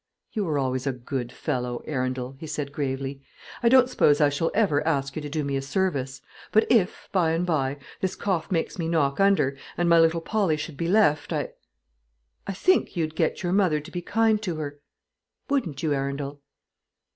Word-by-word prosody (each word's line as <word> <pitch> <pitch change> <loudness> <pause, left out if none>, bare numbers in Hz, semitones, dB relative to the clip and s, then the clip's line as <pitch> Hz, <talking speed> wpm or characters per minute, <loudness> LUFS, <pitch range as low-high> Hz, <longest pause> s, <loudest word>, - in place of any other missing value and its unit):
"You 210 -3 -1
were 155 -4 0
always 130 0 -1
a 135 - +1
good 125 0 -4
fellow, 125 -4 -3
Arundel," 130 -2 -2
he 160 - -7
said, 145 -2 -4
gravely. 135 -1 -3 0.4
"I 235 - +4
don't 255 0 +6
suppose 145 - +3
I 145 -2 +5
shall 145 +4 0
ever 195 -10 +3
ask 140 -4 0
you 155 - -3
to 145 - -6
do 150 +1 -2
me 140 -1 -2
a 135 - 0
service; 135 -5 -2 0.3
but 220 - +4
if, 210 -7 +2
by 170 -4 +2
and 170 +2 0
by, 145 -5 0 0.2
this 190 -1 -1
cough 180 -5 -1
makes 170 +1 -1
me 165 - -1
knock 150 -3 +1
under, 195 -9 +3 0.2
and 175 - +1
my 170 0 +6
little 165 +1 +4
Polly 185 -3 0
should 150 0 -6
be 165 +4 -2
left 170 -7 +3
I - - -1 1.0
I 195 - -2
think 370 - +2
you'd 155 -2 -1
get 160 +3 0
your 175 0 0
mother 185 -6 +3
to 150 - -11
be 175 - -4
kind 220 +3 +2
to 180 -6 -2
her, 145 -2 -5 0.7
wouldn't 175 - -1
you, 155 -2 +2
Arundel?" 140 +1 -3
155 Hz, 195 wpm, -25 LUFS, 140-180 Hz, 1.0 s, don't